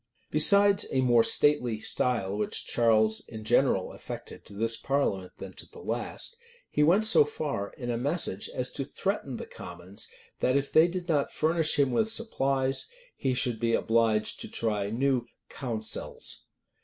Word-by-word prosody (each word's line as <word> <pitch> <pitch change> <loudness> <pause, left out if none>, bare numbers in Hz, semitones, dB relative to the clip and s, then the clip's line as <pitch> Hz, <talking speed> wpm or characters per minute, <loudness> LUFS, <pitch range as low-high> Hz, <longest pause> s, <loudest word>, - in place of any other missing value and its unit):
Besides 200 +6 +5
a 130 - +2
more 120 -2 +5
stately 125 -7 +2
style 110 -4 0
which 105 0 -2
Charles 110 -2 +3
in 110 -1 -8
general 115 -4 +2
affected - - -9
to - - -12
this 115 +2 0
parliament 105 -11 -1
than 95 - -8
to - - -9
the 460 - -14
last, 460 - -3 0.4
he - - +1
went 180 +8 +5
so 220 -8 +7
far, 145 -8 -4
in 120 -2 -4
a 115 - -2
message, 140 - -1
as 125 0 -3
to 135 - -4
threaten 140 - -3
the - - -6
commons 85 +3 -8 0.3
that, 130 +2 +2
if 140 0 -2
they 160 +2 +6
did 180 0 -5
not 150 -5 +1
furnish 160 0 +1
him 140 -3 +3
with 215 - +1
supplies, 135 - 0 0.3
he 130 -2 -1
should 120 -3 +1
be 115 0 +2
obliged 115 -2 +1
to - - -5
try 105 -3 -1
new 125 +1 0 0.2
"counsels." 115 -5 -4
125 Hz, 165 wpm, -28 LUFS, 110-150 Hz, 0.4 s, so